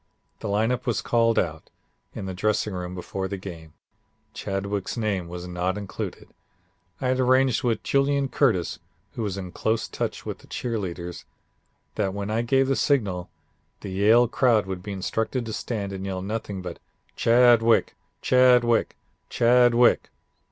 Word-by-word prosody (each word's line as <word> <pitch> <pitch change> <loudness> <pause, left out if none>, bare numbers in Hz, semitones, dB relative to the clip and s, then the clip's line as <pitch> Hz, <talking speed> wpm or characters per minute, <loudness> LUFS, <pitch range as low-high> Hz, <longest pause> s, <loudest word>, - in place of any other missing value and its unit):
The - - -5
lineup 115 +5 0
was 115 -4 +1
called 115 -1 +2
out 80 -2 -1 0.5
in - - -5
the 95 - -4
dressing 105 +2 0
room 90 0 -5
before 95 +1 -4
the 100 - -4
game. 85 -5 -9 0.6
Chadwick's 100 +2 -3
name 100 -6 -1
was 90 +1 -7
not 90 +2 -2
included. 100 -2 -6 0.7
I 130 - -1
had 130 0 +1
arranged 130 -1 +3
with 120 -3 0
Julian 140 0 +2
Curtis, 110 - +1 0.3
who - - -6
was 100 -3 -2
in 90 -2 -6
close 110 +4 -1
touch - - -4
with - - -5
the - - -18
cheer 115 -3 -3
leaders, 90 -2 -6 0.7
that 100 -2 -1
when 100 +1 -3
I 110 +2 +1
gave 135 +3 +2
the 135 - +2
signal, 100 -13 0 0.5
the - - -6
Yale 110 +5 +5
crowd 115 -3 +2
would 95 -1 -5
be 100 +2 -7
instructed 110 +5 -2
to 110 - -5
stand 100 -5 -4
and 95 0 -5
yell 95 -1 -4
nothing 100 -2 -4
but 90 -2 -7 0.4
'Chadwick, 115 -1 +4 0.3
Chadwick, 125 -2 +4 0.3
Chadwick.' 120 0 +4
105 Hz, 155 wpm, -25 LUFS, 95-120 Hz, 0.7 s, Yale